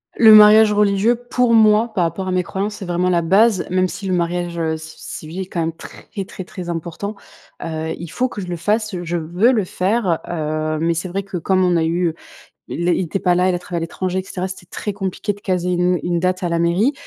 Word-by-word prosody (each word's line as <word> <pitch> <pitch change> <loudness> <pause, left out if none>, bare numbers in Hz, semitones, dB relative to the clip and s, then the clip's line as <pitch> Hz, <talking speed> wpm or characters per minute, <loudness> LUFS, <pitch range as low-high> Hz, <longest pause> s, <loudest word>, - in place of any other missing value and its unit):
Le 220 -2 +8
mariage 215 0 +8
religieux, 205 +2 +3
pour 245 0 0
moi, 220 +1 +5
par 180 -5 +1
rapport 170 +3 -3
à - - -1
mes 185 0 +2
croyances, 200 +4 -3
c'est 195 - -7
vraiment 175 +1 0
la 175 -1 +2
base 195 +4 +3
même 185 0 +2
si 200 +1 -6
le 185 - 0
mariage, 175 0 -1
heu, 160 -1 -1
ci 160 0 -11 0.2
civil 160 +4 -8
est - - -4
quand 175 - -4
même 165 0 -1
très, - - -13 0.2
très, 185 - -8
très 180 -1 -8
important. 170 +5 -4 0.5
Heu, 160 -1 -3
il 170 - -7
faut 255 - 0
que 210 - -6
je 180 - -6
le 175 - -3
fasse, 210 +4 -1
je 175 +1 -2
veux 175 +9 +2
le 225 -5 +1
faire, 185 -1 0
heu, 155 -1 -2
mais 165 +1 +1
c'est 170 +3 -3
vrai 195 +3 -3
que 195 -2 -5
comme 185 +2 +1
on 180 -1 +2
a 165 - +1
eu, 170 +2 +1
heu - - -6 0.6
il 175 - -2
ét 175 - +3
il - - 0
était 170 - -2
pas 180 -1 +2
là, 180 +1 +2
il 180 - +1
a - - -3
travaillé 175 0 -5
à 165 - -2
l'étranger 185 +2 -3
et - - -4
cetera, 185 0 -4
c'était 185 -2 -10
très 205 +3 -5
compliqué 195 +1 -3
de 200 - -16
caser 180 -2 -1
une 180 0 +1
une 175 -1 0
date 185 +1 -1
à 175 - 0
la 170 0 0
mairie, 175 - +2
180 Hz, 255 wpm, -19 LUFS, 170-200 Hz, 0.6 s, Le